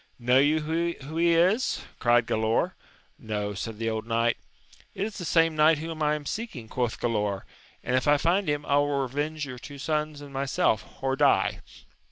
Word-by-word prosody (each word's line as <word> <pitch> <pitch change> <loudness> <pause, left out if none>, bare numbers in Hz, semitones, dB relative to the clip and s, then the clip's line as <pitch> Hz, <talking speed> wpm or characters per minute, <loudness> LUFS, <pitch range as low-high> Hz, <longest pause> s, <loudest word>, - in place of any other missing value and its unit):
Know 125 +1 +3
you 150 +3 +3
who 160 -1 -3
he 170 0 +4
is? 185 +9 +2 0.2
cried 120 -1 +4
Gralaor, 110 +1 +1 0.5
No, 105 -2 -3
said 105 +3 -5
the 115 0 -1
old 110 0 -4
knight. 115 +1 +2 0.6
It 195 - -1
is 215 -1 -6
the 175 - -5
same 165 -1 +3
knight 155 +1 +5
whom 160 +1 -6
I 150 0 +2
am 150 -1 -7
seeking, 155 - -5
quoth 120 0 -2
Gkdaor, 105 -4 -1 0.4
and, 125 - 0
if 130 - +1
I 145 0 +6
find 175 +4 +1
him, 145 0 -1
I 140 - +2
will 145 -1 +1
revenge 145 +4 -3
your 125 -3 -8
two 140 +3 -10
sons 150 +1 -2
tod 145 -1 -10
myself, 135 -6 -1
or 135 0 +1
die. 140 0 +2
145 Hz, 190 wpm, -27 LUFS, 120-155 Hz, 0.6 s, I